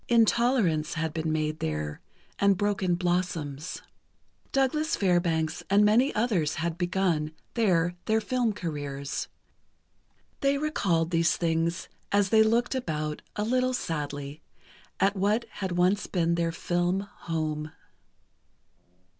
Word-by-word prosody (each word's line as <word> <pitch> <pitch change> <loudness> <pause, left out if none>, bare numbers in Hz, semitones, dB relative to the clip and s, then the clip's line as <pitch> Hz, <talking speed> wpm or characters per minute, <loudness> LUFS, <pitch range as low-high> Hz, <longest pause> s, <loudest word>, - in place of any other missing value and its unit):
"Intolerance" 225 - +3
had 160 -2 -2
been 160 -1 -1
made 155 0 -1
there, 75 -1 -3 0.4
and 200 -1 +4
"Broken 200 -3 +1
Blossoms." 175 -4 -2 0.7
Douglas 300 +4 +1
Fairbanks 170 -4 +1
and 205 +1 +5
many 240 +7 +4
others 200 -10 +1
had 170 0 -2
begun, 175 -3 0 0.2
there, 175 -6 +2
their 220 0 +2
film 245 0 0
careers. 145 -6 -4 1.1
They 275 0 +2
recalled 185 - 0
these 165 -1 +2
things 165 0 0 0.2
as 200 -1 +3
they 220 +1 +6
looked 230 +3 +2
about 155 -11 -3
a 210 - -1
little 255 +3 +1
sadly, 145 - -4 0.6
at 195 +2 +3
what 205 +4 +1 0.2
had 190 -2 -1
once 180 +3 +2
been 170 -2 +1
their 170 -1 0
film 175 +3 0
home. 155 -5 -4
175 Hz, 120 wpm, -28 LUFS, 160-210 Hz, 1.1 s, they